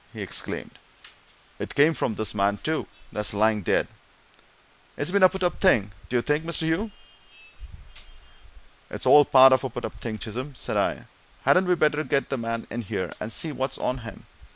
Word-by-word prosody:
he - - -9
exclaimed. - - -2 0.8
"It - - -6
came 150 +3 +5
from 110 - -2
this 110 - -3
man, 100 0 +1
too, 155 +8 -2 0.2
that's 105 -1 -3
lying 110 0 +2
dead - - +1 1.1
it's 145 - -2
been 200 0 +2
a 185 - +8
put 190 0 -5
up 175 - -1
thing, 105 - +3 0.2
d'ye 120 -1 +1
think, 150 +4 0
Mr. 165 0 -1
Hugh?" 165 +7 0 2.0
"It's - - -6
all 145 - +8
part 130 0 +7
of 130 - +2
a 130 - -2
put 120 +1 -6
up - - -8
thing, 110 -2 -4
Chisholm," 125 +6 -6
said - - -4
I. - - 0 0.4
"Hadn't 185 0 +4
we 180 - +3
better 155 -2 +1
get 140 -2 -1
the 135 - -1
man 115 0 -3
in 120 - -3
here, 95 -3 -4
and 110 - -5
see 160 +6 -2
what's 135 -2 -3
on 125 +1 -2
him? 115 -2 -10
130 Hz, 185 wpm, -25 LUFS, 110-160 Hz, 2.0 s, a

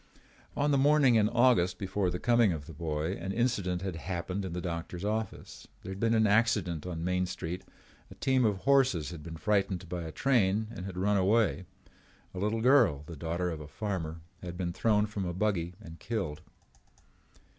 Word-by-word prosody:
On 145 +1 +2
the 140 - +3
morning 145 -2 +5
in 110 -2 +4
August 120 -7 +3
before 95 -1 -1
the 90 - -2
coming 120 -1 +3
of 75 -4 -4
the 80 - -10
boy, 75 +1 -2
an 95 +3 -4
incident 100 -6 0
had 95 -4 -3
happened 90 +3 -3
in 95 -3 -5
the 90 - -3
doctor's 85 +1 -4
office. 110 +1 -4 0.2
There 95 - -6
had 95 - -6
been 115 +1 +2
an 110 0 +4
accident 100 -6 +2
on 85 -2 -4
Main 90 +1 0
Street. 90 0 -5 0.5
A - - -12
team 130 -2 +2
of 105 -4 +1
horses 130 - +3
had 85 -3 -8
been 80 +1 -8
frightened 95 0 0
by 90 +1 -4
a 80 -1 -6
train 110 - +2
and 95 -4 -6
had 95 -2 -7
run 100 +2 +2
away. 95 -1 +2 0.7
A 95 - -5
little 105 +3 0
girl, 120 - +4
the 85 - -8
daughter 85 +3 -2
of 80 -2 -6
a 75 - -8
farmer, 85 -3 -4 0.2
had 90 -1 -7
been 85 -2 -2
thrown 105 +1 +2
from 105 -2 -4
a 90 -1 -3
buggy 90 -4 -1
and 85 -6 -11
killed. 95 -9 -3
95 Hz, 195 wpm, -30 LUFS, 85-110 Hz, 0.7 s, morning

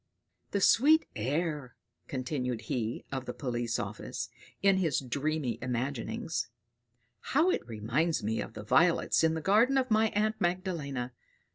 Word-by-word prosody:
"The 200 - -1
sweet 305 +11 +6
air!" 145 +3 -2 0.3
continued 125 -3 -2
he 115 0 -3
of 130 -2 -3
the 125 - -5
police 120 -3 -2
office, - - -4 0.3
in 195 -1 +5
his 165 -7 +1
dreamy 135 -2 -2
imaginings; 125 0 -2 0.7
"how 315 - +2
it - - 0
reminds 120 +9 0
me 110 +2 0
of - - -7
the 105 - -7
violets 165 +12 +3
in 160 0 +3
the 160 - -3
garden 225 - +4
of 260 -2 +1
my 220 +1 +5
aunt 215 +1 +1
Magdalena! 165 -9 -2
145 Hz, 140 wpm, -30 LUFS, 125-190 Hz, 0.7 s, sweet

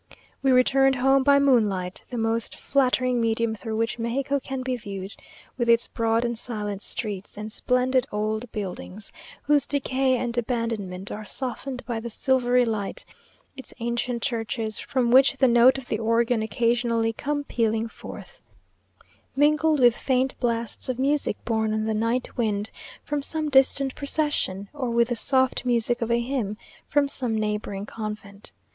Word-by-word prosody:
We 270 - +2
returned 270 +1 +4
home 270 +2 +3
by 280 +1 +5
moonlight, 210 -10 +1
the 245 - -5
most 225 0 -1
flattering 255 -2 +1
medium 230 0 +1
through 220 0 -5
which 230 +1 -1
Mexico 270 +4 -1
can 265 -1 -5
be 255 0 -1
viewed; 200 -4 -7 0.5
with 240 -1 +1
its 230 0 +5
broad 230 0 0
and 235 0 -1
silent 210 -4 -4
streets, 205 -4 -4
and 215 +1 -6
splendid 255 +2 +1
old 215 +2 -2
buildings, 200 0 -6 0.3
whose 290 -3 +3
decay 265 -2 +1
and 240 -1 -1
abandonment 225 -6 -2
are 215 - -5
softened 260 +3 -2
by 235 -2 -3
the 235 +1 -6
silvery 250 +1 +2
light; 215 -3 -3 0.5
its 265 - -10
ancient 235 0 -2
churches, 225 -3 -2
from 250 -3 0
which 270 +2 +6
the 265 - +4
notes 245 +2 +6
of 265 -2 -8
the 215 - -2
organ 230 +1 +1
occasionally 230 +1 +1
come 290 +5 -2
pealing 225 -3 0
forth, - - -11 0.9
mingled 300 +2 +3
with 240 -2 +5
faint 260 +1 0
blasts 235 0 -2
of 255 - -1
music 280 +2 0
borne 220 -1 0
on 215 0 -1
the 220 - 0
night 230 +4 -1
wind 215 -3 -1 0.3
from 295 -1 -2
some 310 +1 -3
distant 270 0 +3
procession; 280 -10 -1
or 270 -4 -3
with 235 0 +2
the 240 - 0
soft 260 +2 +2
music 240 -1 +2
of 230 - -1
a 235 0 +2
hymn 235 -5 -2 0.3
from 290 -1 +2
some 245 -5 0
neighbouring 210 -2 -3
convent. 210 -1 -7
235 Hz, 160 wpm, -25 LUFS, 220-260 Hz, 0.9 s, which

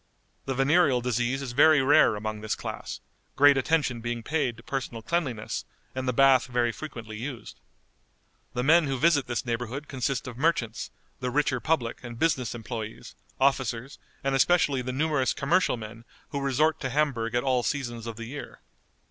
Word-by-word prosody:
The 135 - -2
venereal 135 0 +4
disease 125 +2 -1
is 130 - -4
very 150 +4 +6
rare 135 -4 +5
among 110 0 -4
this 110 0 -2
class, - - -6 0.3
great 145 0 +7
attention 135 -3 +1
being 120 0 -3
paid 135 -4 -1
to 115 - -14
personal 125 -5 -4
cleanliness, 130 -11 -2 0.3
and 130 0 -4
the - - +3
bath 135 0 +5
very 120 -1 +1
frequently 115 -6 -8
used. 125 +1 -7 1.0
The 125 - 0
men 160 +3 +5
who 135 -1 -1
visit 145 0 +3
this 120 +1 -2
neighborhood 120 +4 -3
consist 135 0 -2
of 125 -1 -8
merchants, 125 -8 0 0.3
the 125 - -2
richer 130 -1 +1
public 130 -6 -1
and 120 -1 -7
business 130 -6 0
employés, 115 -1 -6 0.3
officers, 130 -1 0 0.2
and 135 0 0
especially 140 -1 +3
the 125 +1 -4
numerous 145 -1 +1
commercial 170 0 +1
men 115 +1 -9 0.3
who 140 -2 -3
resort 140 +3 +2
to 130 - -3
Hamburg 125 -5 0
at 120 - +1
all 130 -2 +2
seasons 120 -4 -3
of 115 - -5
the 115 +1 -7
year. 140 +5 -8
130 Hz, 170 wpm, -27 LUFS, 120-145 Hz, 1.0 s, great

